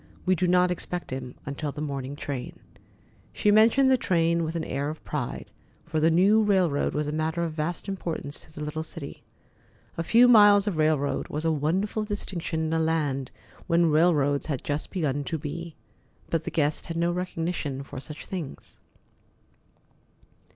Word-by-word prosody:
"We 185 - +4
do 180 0 +1
not 180 0 +4
expect 180 -2 -4
him 130 -1 -5
until 140 +2 -3
the 145 - -9
morning 140 -2 -4
train." 140 -3 -5 0.7
She 210 - +2
mentioned 230 +6 +5
the 260 - +4
train 170 -3 +2
with 160 +1 -3
an 165 - -1
air 140 +2 -2
of 155 - -8
pride, - - -4 0.3
for 165 -1 -1
the 160 +1 +4
new 195 +6 +5
railroad 185 -11 +2
was 150 0 0
a 150 - -2
matter 160 +2 -1
of 165 -2 -3
vast 160 +5 -3
importance 165 -6 -4
to - - -16
the 150 0 -7
little 150 +1 -3
city. 160 -2 -8 0.8
A - - 0
few 235 +8 +6
miles 205 -4 +7
of 200 -6 -2
railroad 155 -2 +1
was 155 +2 -4
a 165 - +3
wonderful 185 +9 0
distinction 185 -6 -3
in 160 0 -1
a 165 - +2
land 150 -5 0 0.4
where 170 - +3
railroads 150 -3 +3
had 140 -5 -3
just 145 +1 -2
begun 145 -6 -1
to 160 - -2
be. 160 +2 -6 0.6
But 165 -1 0
the - - -1
guest 150 -1 0
had 165 - -4
no 170 +1 +1
recognition 165 -6 -3
for 135 - -8
such 150 +3 -9
things. 175 -7 -7
160 Hz, 175 wpm, -26 LUFS, 150-180 Hz, 0.8 s, miles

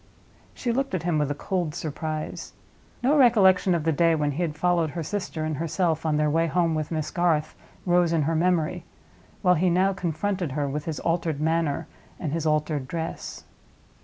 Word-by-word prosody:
She 240 - -2
looked 265 -3 -1
at 170 - -3
him 170 -3 +1
with 150 -1 0
a 145 - -2
cold 175 -1 -2
surprise. 155 0 -5 0.5
No 275 +4 +4
recollection 195 - +5
of 165 - -1
the 160 - +2
day 165 +2 +3
when 150 -2 0
he 150 +5 -3
had 160 -4 -1
followed 170 -1 +2
her 165 +2 -4
sister 170 -4 -3
and 155 -2 -2
herself 165 0 0
on 150 -1 +2
their 150 0 +2
way 165 +2 +2
home 165 0 +1
with 155 -1 -2
Miss 155 -2 -3
Garth 165 -4 +1 0.3
rose 175 -2 +3
in 165 -3 +2
her 160 +3 0
memory, 175 0 +1 0.6
while 180 -1 +5
he 180 +2 +2
now 185 +3 +3
confronted 180 -2 -2
her, 145 0 -1
with 145 +2 -4
his 160 -3 -3
altered 165 -3 -1
manner 160 -1 0 0.3
and 155 -6 -3
his 160 -1 -1
altered 150 -3 0
dress. 165 +1 -5
165 Hz, 190 wpm, -25 LUFS, 155-180 Hz, 0.6 s, recollection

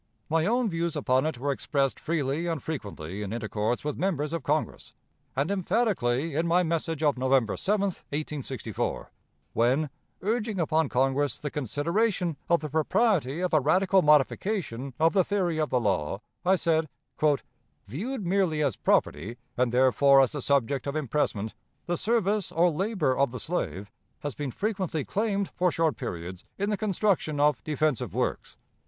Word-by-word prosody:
My 160 +1 +2
own 240 +2 +2
views 170 -3 -1
upon 130 0 +2
it 155 - -3
were 140 +3 -1
expressed 135 -1 -1
freely 155 0 -1
and 165 -5 -2
frequently 100 - -5
in 100 -1 -4
intercourse 110 +1 -2
with 150 0 -3
members 165 -5 -1
of 165 - -1
Congress, 150 +3 -2 0.4
and 140 +7 0
emphatically 180 - 0
in 160 +4 0
my 175 +2 +4
message 165 -1 -1
of 145 -4 +2
November 130 -3 +2
7, 205 +1 +1
1864, 150 - -3 0.4
when, 130 +5 +2 0.3
urging 215 -1 -1
upon 160 -2 +1
Congress 135 +1 +1
the 145 - -5
consideration 170 - 0
of 170 -3 +4
the 155 - -4
propriety 160 - +1
of 180 -1 -1
a 155 - +6
radical 185 +7 +3
modification 150 - +1
of 165 +1 +4
the 190 -2 +4
theory 180 -5 0
of 155 - 0
the 125 - +2
law, 95 -5 0 0.2
I 185 +2 +4
said: 160 -3 +1 1.0
"Viewed 200 - -4
merely 175 -4 +1
as 135 -8 +1
property, 100 +11 0 0.2
and 125 -1 +1
therefore 130 +2 +5
as 130 - +2
the 145 - -4
subject 140 0 +1
of 140 - -2
impressment, 125 -7 -1 0.3
the 175 - 0
service 210 -1 0
or 170 +1 +3
labor 185 - 0
of 140 0 +2
the 125 +1 -6
slave 100 - -3 0.3
has 145 -2 -3
been 145 -2 -4
frequently 190 - -2
claimed 200 -2 -1
for 180 -1 +1
short 160 -2 +1
periods 90 -6 -6
in 200 +2 -1
the - - +2
construction 195 -6 0
of 150 -1 +3
defensive 155 -4 -1
works. - - -2
155 Hz, 160 wpm, -27 LUFS, 130-180 Hz, 1.0 s, a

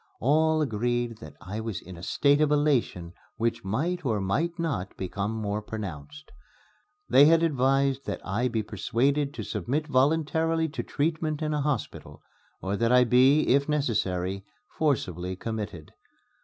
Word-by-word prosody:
All 155 +4 +3
agreed 120 -1 -1
that 75 -2 -11
I 100 +4 -6
was 110 -3 -4
in 90 +1 -11
a 85 - -11
state 145 - +2
of 150 -1 +3
elation 130 - +1 0.2
which 115 +1 -1
might 160 - -2
or 110 -6 0
might 150 - -1
not 140 - -3
become 100 +3 -3
more 105 -1 -3
pronounced. 75 -10 -8 0.8
They 140 +2 +7
had 165 +2 +5
advised 135 -2 +1
that - - -3
I 110 +7 0
be 115 -3 -1
persuaded 130 +8 0
to - - -5
submit 130 - -2
voluntarily 160 +3 +1
to 145 - -4
treatment 155 0 -2
in 155 0 -1
a 150 - 0
hospital, 140 -5 -4 0.4
or 95 +1 -1
that 115 +2 +1
I 125 0 +6
be, 130 +5 +5
if 140 +3 +3
necessary, 100 -10 -1 0.3
forcibly 95 - -1
committed. 105 -6 -6
125 Hz, 150 wpm, -27 LUFS, 100-150 Hz, 0.8 s, They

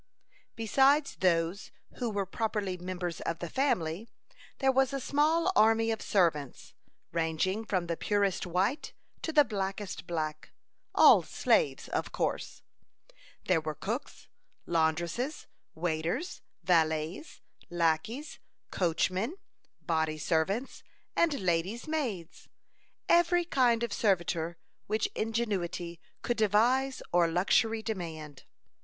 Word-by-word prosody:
Besides 270 +6 +3
those 170 +1 +1 0.3
who 245 -2 -1
were 200 -2 -1
properly 205 -1 -2
members 180 -1 -5
of 165 - -2
the 175 -2 -6
family, 210 - 0 0.5
there 270 0 +3
was 265 0 +2
a 275 - -1
small 310 +7 +2
army 225 -1 +4
of 220 - -3
servants, 160 -8 0 0.4
ranging 165 +5 0
from 185 -5 -1
the 170 0 -2
purest 200 0 0
white 190 - -1 0.3
to 320 - -2
the 295 -2 +6
blackest 195 -3 -4
black; 155 -2 -4 0.4
all - - +8
slaves, 475 - +1
of - - -3
course. - - -3 0.8
There 180 -4 +2
were 155 -1 -4
cooks, 220 - -5 0.4
laundresses, 170 - -1 0.3
waiters, 165 - -2 0.2
valets, 160 - 0 0.3
lackeys, 175 - -1 0.3
coachmen, 185 - 0 0.5
body 160 -2 0
servants, 180 - -1 0.3
and 325 -4 +2
lady's 185 - -1
maids; 235 - -4 0.6
every 345 0 +4
kind 245 -7 +2
of 235 - -2
servitor 170 -4 0 0.3
which 215 +1 0
ingenuity 190 -7 -2 0.2
could 240 - -1
devise 240 +6 +2
or 175 -1 +4
luxury 220 +6 +2
demand. 160 - -6
195 Hz, 110 wpm, -30 LUFS, 170-235 Hz, 0.8 s, all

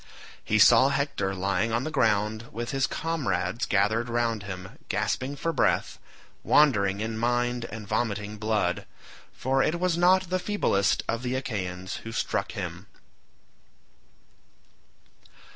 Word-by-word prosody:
He 110 - +1
saw 120 +5 +7
Hector 135 -9 -1
lying 100 +4 0
on 115 +2 0
the 155 - -4
ground 110 -1 +1
with 120 +1 -4
his 135 -1 +1
comrades 130 - -2
gathered 110 +4 +1
round 115 -2 0
him, 95 - -8
gasping 135 +2 -1
for 165 +4 -2
breath, - - +1 0.4
wandering 100 -9 +3
in 110 0 -3
mind 120 0 0
and 110 -2 -8
vomiting 105 -1 -2
blood, 105 -5 0 0.4
for 135 +1 0
it 160 +5 0
was 180 -2 +1
not 185 0 +4
the 185 - +1
feeblest 100 - +1
of 115 +1 -1
the 125 0 -2
Achaeans 95 -8 -4
who 115 - -8
struck - - -2
him. - - -6
115 Hz, 130 wpm, -27 LUFS, 105-135 Hz, 0.4 s, saw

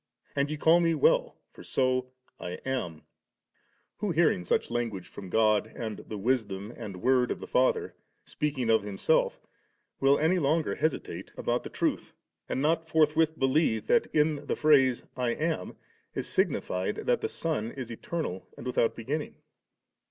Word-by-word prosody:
and 140 0 +1
ye 155 - -3
call 160 +3 +5
Me 165 -1 +2
well, - - +2 0.2
for - - -13
so 130 -1 0 0.3
I 90 - -5
am,' 125 -12 -3 0.9
who, 210 - -2
hearing 160 - +2
such 90 - 0
language 115 -6 -2
from 95 - -10
God, 110 0 +2
and 110 -2 -5
the 110 - -7
Wisdom, 105 -2 -1
and 100 -6 -8
Word 125 -1 +3
of - - -2
the - - -8
Father, 130 +1 +1 0.3
speaking 135 -6 -1
of 110 -1 +4
Himself, 100 -1 +1 0.6
will 135 +1 +4
any 170 +4 +2
longer 155 +1 +1
hesitate 160 - -2
about - - 0
the - - -7
truth, - - -2 0.4
and 135 - -1
not 160 +1 +1
forthwith 160 0 +3
believe 130 -5 +2
that 235 - +3
in 150 -1 +1
the - - 0
phrase 135 -5 +4
*I 125 -2 0
am,' 160 +1 -2 0.4
is - - -2
signified 435 - 0
that - - +2
the 440 - -1
Son 155 - -1
is 125 -2 -7
eternal 115 - -4
and - - -9
without 125 -2 +1
beginning 145 +7 -4
130 Hz, 160 wpm, -29 LUFS, 115-160 Hz, 0.9 s, call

